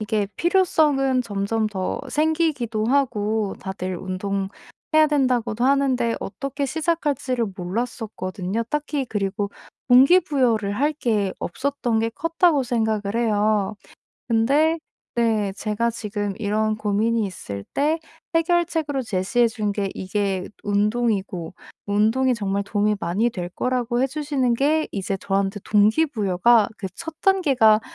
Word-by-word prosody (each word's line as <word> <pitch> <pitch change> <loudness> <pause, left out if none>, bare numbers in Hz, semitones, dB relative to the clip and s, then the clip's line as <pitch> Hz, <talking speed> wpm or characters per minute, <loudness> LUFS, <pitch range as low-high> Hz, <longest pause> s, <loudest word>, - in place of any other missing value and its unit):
이게 210 -1 0
필요성은 300 -8 +2
점점 215 0 -1
더 190 -3 -3
생기기도 300 -8 0
하고 220 -6 0
다들 185 -1 -4
"운동해야 195 - -1
된다."고도 250 -5 +1
하는데 260 -4 +2
어떻게 275 +6 -4
시작할지를 285 -6 -1
몰랐었거든요. 200 0 -3
딱히 290 +1 -2
그리고 200 -1 -2 0.4
'동기 270 +9 +7
부여를 240 - +1
할 295 +2 +2
게 215 -9 0
없었던 245 +1 -1
게 230 0 0
컸다.'고 330 0 +2
생각을 220 -3 -1
해요. 215 -2 +1 0.5
근데 280 +8 +3 0.4
네 220 -4 +1
제가 220 +2 0
지금 205 -3 -3
이런 215 0 0
고민이 215 +2 +1
있을 100 - -7
때 310 +3 +1 0.3
해결책으로 330 -4 +1
제시해 225 +2 +1
준 210 -3 -2
게 200 -2 -1
이게 190 -1 -2 0.2
운동이고 205 -4 0 0.3
운동이 220 +6 +2
정말 200 -3 -1
도움이 210 +1 +1
많이 200 +8 +1
될 175 -5 -5
거라고 245 +3 -1
해 265 - +3
주시는 275 -3 0
게 300 +5 +1
이제 195 -1 -2
저한테 195 +1 -1
동기 215 +9 +4
부여가 220 - +3
그 190 - -4
1 325 -1 -7
단계가 270 - +4
225 Hz, 280 characters per minute, -23 LUFS, 205-275 Hz, 0.5 s, 동기